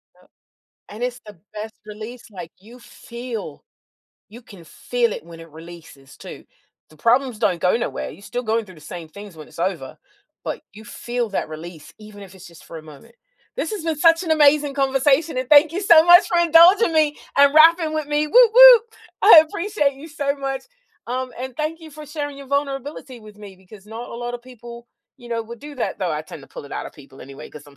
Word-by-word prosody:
Yep, - - -26 0.6
and 215 +4 -10
it's 250 0 -4
the 205 -5 -13 0.2
best 220 +1 -7
release, 215 +3 -10
like, 175 -4 -10
you 230 +6 -16
feel 235 - -9 0.6
you 235 +4 -14
can 195 -6 -15
feel 235 +7 -2
it - - -8
when 165 -1 -13
it 165 0 -14
releases, 160 -4 -14
too. - - -12 0.4
The 155 - -21
problems 240 - 0
don't 170 -2 0
go 180 +5 +2
nowhere, 240 - -5
you're 180 - -15
still 245 +4 -5
going 225 0 -1
through 185 -3 -15
the - - -16
same 165 +1 -10
things 200 +1 -13
when 155 -1 -12
it's - - -18
over, 170 -6 -4 0.5
but - - -5
you 215 +2 -14
feel 240 +1 -5
that 195 - -3
release 160 0 -11
even 210 -1 -13
if 195 -1 -14
it's 190 0 -14
just 170 -2 -16
for 165 - -10
a 155 - -13
moment. 155 +10 -16 0.4
This 470 - -4
has 405 -6 -6
been 320 -2 -2
such 330 +1 +4
an 335 - -6
amazing 295 -2 +3
conversation, 275 +2 +1
and 255 -1 -4
thank 300 +1 +6
you, 370 - -3
so, 335 -4 +6
much 350 0 +7
for 345 - +1
indulging 345 +4 +5
me 310 -2 +1 0.2
and 280 +1 +5
rapping 325 0 +5
with 310 -2 -3
me! 295 +1 -1
Whoop 480 +6 +5
whoop! - - +9 0.4
I 395 -7 +9
appreciate 335 -5 -2
you 280 +4 -12
so 285 -2 -3
much, 270 -1 -5 0.4
um, 255 +1 -4
and 260 +2 -7
thank 315 +2 -4
you 320 -1 -13
for 300 0 -12
sharing 290 -1 -6
your 275 - -11
vulnerability 280 -2 -4
with 215 -1 -15
me, 200 -3 -12
because 190 +2 -17
not 225 +3 -9
a - - -9
lot 240 +1 -6
of 240 - -9
people, 240 -1 -13 0.3
you 240 - -14
know, 230 -1 -3
would 235 +1 -11
do 295 0 -10
that, - - -4
though 180 -4 -2
I 150 - -4
tend 155 -2 -12
to - - -16
pull - - -11
it 140 - -12
out - - -5
of - - -12
people 135 -2 -17
anyway, 135 +1 -12
'cause 150 -1 -13
I'm 140 -1 -18
245 Hz, 225 wpm, -20 LUFS, 195-295 Hz, 0.6 s, whoop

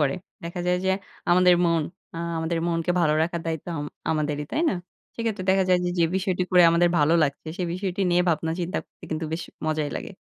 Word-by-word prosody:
করে। 140 -2 +2 0.3
দেখা 170 +1 -4
যায় 180 0 +3
যে 190 - +3 0.4
আমাদের 180 0 +6
মন 165 -1 +2 0.3
আ - - -5 0.2
আমাদের 160 +1 -1
মনকে 165 0 0
ভালো 155 -3 +3
রাখার 170 +1 -1
দায়িত্ব 160 -2 -3
আম 145 - -3 0.3
আমাদেরই, 150 -1 -1
তাই 310 - 0
না? - - -1 0.4
সেক্ষেত্রে 225 -5 -2
দেখা 190 0 +3
যায় 180 -1 +5
যে, - - +1
যে 170 - +5
বিষয়টি 185 -1 0
করে 180 -1 +7
আমাদের 170 +1 +4
ভালো 150 +2 +4
লাগছে 140 +2 -2
সে 190 - -2
বিষয়টি 185 +1 -3
নিয়ে 175 +1 +4
ভাবনা 160 0 +1
চিন্তা 175 +3 -2
করতে - - -17
কিন্তু 160 0 -2
বেশ 165 +1 -2 0.2
মজাই 155 -2 0
লাগে। - - -6
170 Hz, 210 wpm, -25 LUFS, 160-180 Hz, 0.4 s, করে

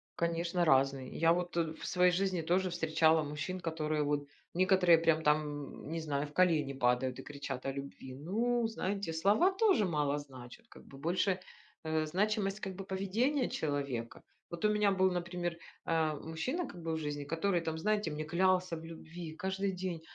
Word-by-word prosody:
Конечно 170 +1 0
разные. 135 -2 +3
Я 165 +1 +4
вот, 175 0 -1
э, 160 -1 0
в - - -9
своей 180 0 +4
жизни 185 -1 0
тоже 185 +3 +1
встречала 160 -2 +3
мужчин, 150 +5 -4
которые 155 -2 -1
вот 145 0 -1 0.3
некоторые 185 -2 +5
прям 160 -1 +3
там, 150 -2 -1
не 165 - -2
знаю, 150 -2 -2
в 145 - -15
колени 160 -6 +3
падают 125 0 +1
и - - -7
кричат 140 -3 -6
о 135 - 0
любви. 135 -1 -7
Ну, 225 - 0
знаете, 200 -4 -2
слова 205 - +4
тоже 380 - +3
мало 150 -4 0
значат, 135 - -12
как - - -14
бы 135 - -13
больше, 180 +4 +1 0.5
э, 155 0 +1
значимость, 200 +4 0
как 190 -2 -5
бы 195 0 -7
поведения 225 +9 0
человека. 140 -6 -3 0.3
Вот 170 +3 -3
у 210 - +5
меня 210 -1 +3
был, 190 0 +3
например, 175 -1 -3 0.3
а, 160 -2 +1
мужчина, 165 - -3
как 175 - -10
бы 165 -1 -2
в - - -1
жизни, 145 -1 -3
который 170 +4 0
там, 160 -1 -3
знаете, 210 -3 0
мне 155 +1 -3
клялся 185 +2 +2
в 160 - -9
любви 165 0 -8
каждый 195 +1 -1
день: 175 -4 -3
165 Hz, 180 wpm, -33 LUFS, 150-190 Hz, 0.5 s, некоторые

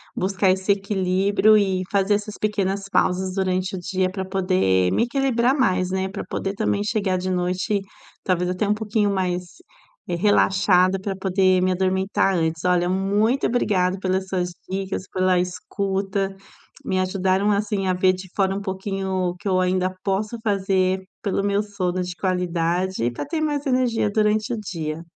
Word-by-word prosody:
buscar 195 +1 +1
esse 190 +2 +2
equilíbrio 195 +1 +2
e 190 -3 +2
fazer 200 +1 +2
essas 210 0 -5
pequenas 200 -2 -1
pausas 185 +1 +1
durante 185 0 -1
o - - -4
dia 185 +1 -1
pra 190 -1 -4
poder 185 - +1
me 95 - +2
equilibrar 255 0 +1
mais, 185 -8 +1
né, 190 0 -1
pra 200 - -5
poder 195 +1 -3
também 205 -1 0
chegar 205 -3 0
de 185 +1 -3
noite 185 +3 0 0.4
talvez 180 -1 0
até 185 +3 -1
um 210 - +3
pouquinho 210 -1 0
mais, 180 -1 -1 0.6
eh, 175 - -1
relaxada 190 -1 +3
pra 195 0 -4
poder 190 -1 +2
me 185 0 +2
adormitar 190 +1 +1
antes. 160 0 -1
Olha, 180 -1 +2
muito 205 +7 +1
obrigada 190 -6 +1
pelas 190 0 -1
suas 180 -2 -1 0.2
dicas, 190 0 -3
pela 185 -1 +2
escuta, 195 +2 -2 0.5
me 185 - -1
ajudaram, 190 +2 +1
assim, 205 -1 0
a 185 - +2
ver 185 +1 +3
de 185 +1 -8
fora 195 -1 +1
um 200 - -2
pouquinho 195 0 -4 0.2
o 175 - -5
que 190 - -8
eu 185 -1 +2
ainda 185 0 0
posso 210 +4 -1
fazer 190 -2 +1 0.2
pelo 200 -2 -1
meu 200 +1 +1
sono 185 -3 -2
de 180 -1 -6
qualidade 180 -3 -1
e 120 - +1
pra 120 - -5
ter 315 +3 -3
mais 295 -1 -1
energia 250 -5 +1
durante 215 +2 +1
o - - -2
dia. 165 -5 -5
190 Hz, 170 wpm, -23 LUFS, 185-205 Hz, 0.6 s, um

